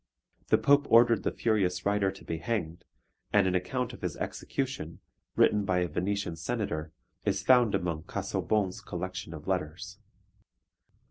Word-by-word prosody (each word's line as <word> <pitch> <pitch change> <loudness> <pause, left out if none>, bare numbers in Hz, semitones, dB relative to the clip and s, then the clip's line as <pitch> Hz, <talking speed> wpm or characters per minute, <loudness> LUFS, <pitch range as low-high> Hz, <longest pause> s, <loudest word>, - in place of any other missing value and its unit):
The - - +5
Pope 145 0 +4
ordered 115 -2 +6
the - - -1
furious 95 -5 0
writer 100 -1 +2
to 95 - -14
be 80 - -3
hanged, 85 -3 -3 0.5
and 105 -2 +4
an 95 - +1
account 120 +7 -1
of - - -11
his 90 -4 -3
execution, 130 - -4 0.4
written 105 -1 +4
by 95 -2 +1
a 90 - +1
Venetian 90 +2 -2
senator, 80 -5 -3 0.3
is 100 -1 0
found 120 -2 +5
among 85 -5 -2
Casaubon's 100 -4 -1
collection 90 -1 -5
of 75 -3 -9
letters. 95 +2 -3
95 Hz, 145 wpm, -29 LUFS, 90-110 Hz, 0.5 s, ordered